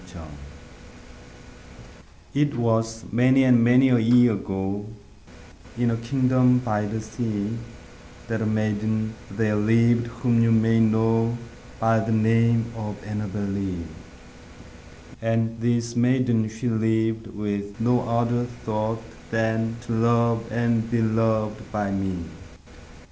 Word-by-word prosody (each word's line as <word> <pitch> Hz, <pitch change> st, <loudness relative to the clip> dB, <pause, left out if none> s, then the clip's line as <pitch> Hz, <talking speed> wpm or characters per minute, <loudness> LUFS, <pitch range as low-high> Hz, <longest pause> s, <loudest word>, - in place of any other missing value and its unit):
5 85 Hz, -3 st, -11 dB, 2.1 s
It 145 Hz, +1 st, +1 dB
was 115 Hz, -1 st, 0 dB
many 130 Hz, +3 st, +4 dB
and 125 Hz, -3 st, +5 dB
many 125 Hz, +3 st, +5 dB
a 125 Hz, -1 st, +4 dB
year 120 Hz, +1 st, +5 dB
ago, 95 Hz, 0 st, -3 dB, 0.9 s
In 120 Hz, -1 st, +1 dB
a 115 Hz, -, -1 dB
kingdom 125 Hz, +1 st, +2 dB
by 105 Hz, -4 st, -1 dB
the 110 Hz, +2 st, -3 dB
sea, 110 Hz, -1 st, -3 dB, 0.7 s
That 110 Hz, -1 st, -2 dB
a -, -, 0 dB
maiden 110 Hz, 0 st, -1 dB, 0.2 s
there 105 Hz, +1 st, -1 dB
lived 115 Hz, +3 st, +3 dB
whom 115 Hz, 0 st, 0 dB
you 115 Hz, 0 st, +3 dB
may 115 Hz, 0 st, +3 dB
know 115 Hz, +1 st, +2 dB, 0.4 s
By 115 Hz, 0 st, +3 dB
the 110 Hz, +1 st, -2 dB
name 115 Hz, +1 st, +3 dB
of 105 Hz, -2 st, -6 dB
ANNABEL 105 Hz, -1 st, -4 dB
LEE; 100 Hz, -3 st, -3 dB, 1.4 s
And 115 Hz, 0 st, -1 dB
this 120 Hz, 0 st, 0 dB
maiden 120 Hz, -2 st, +2 dB
she 110 Hz, +3 st, -5 dB
lived 110 Hz, 0 st, 0 dB
with 100 Hz, -1 st, -5 dB
no 120 Hz, +2 st, +2 dB
other 120 Hz, +1 st, +1 dB, 0.2 s
thought 110 Hz, +1 st, -2 dB, 0.3 s
Than 115 Hz, 0 st, -1 dB
to 120 Hz, -1 st, -8 dB
love 115 Hz, 0 st, +1 dB
and 115 Hz, -1 st, 0 dB
be 120 Hz, -1 st, +1 dB
loved 110 Hz, -1 st, 0 dB
by 105 Hz, -2 st, -2 dB
me. 95 Hz, -3 st, -3 dB
115 Hz, 120 wpm, -24 LUFS, 110-120 Hz, 2.1 s, and